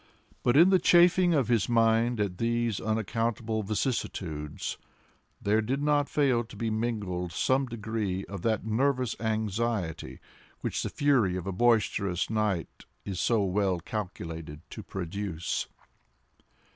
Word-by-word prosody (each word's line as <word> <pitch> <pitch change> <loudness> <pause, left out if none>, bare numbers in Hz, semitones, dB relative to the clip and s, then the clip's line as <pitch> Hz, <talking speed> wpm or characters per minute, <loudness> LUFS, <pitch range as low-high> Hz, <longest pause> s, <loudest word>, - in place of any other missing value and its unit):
But 120 +2 +3
in 175 +5 +7
the 190 - +5
chafing 175 0 +5
of 135 -6 +2
his 115 -3 +2
mind 115 0 +3
at 95 -3 -2
these 115 -2 0
unaccountable 110 +1 -1
vicissitudes, 95 - -3 0.6
there 105 +2 +2
did 130 +6 -1
not 145 -1 +2
fail 130 -5 +2
to 110 - -13
be 115 -2 -2
mingled 105 -6 -2
some 130 +8 +1
degree 110 -4 -3
of 100 -3 -7
that 110 0 0
nervous 125 +2 +1
anxiety 110 -4 -2 0.4
which - - -2
the - - -2
fury 125 -11 +2
of 90 -1 -4
a 95 - -2
boisterous 100 -3 +1
night 105 -6 -2 0.2
is 95 -3 -4
so 115 -4 +2
well 95 -1 +1
calculated 80 -6 -6
to - - -7
produce. 95 -2 -4
110 Hz, 130 wpm, -28 LUFS, 95-120 Hz, 0.6 s, in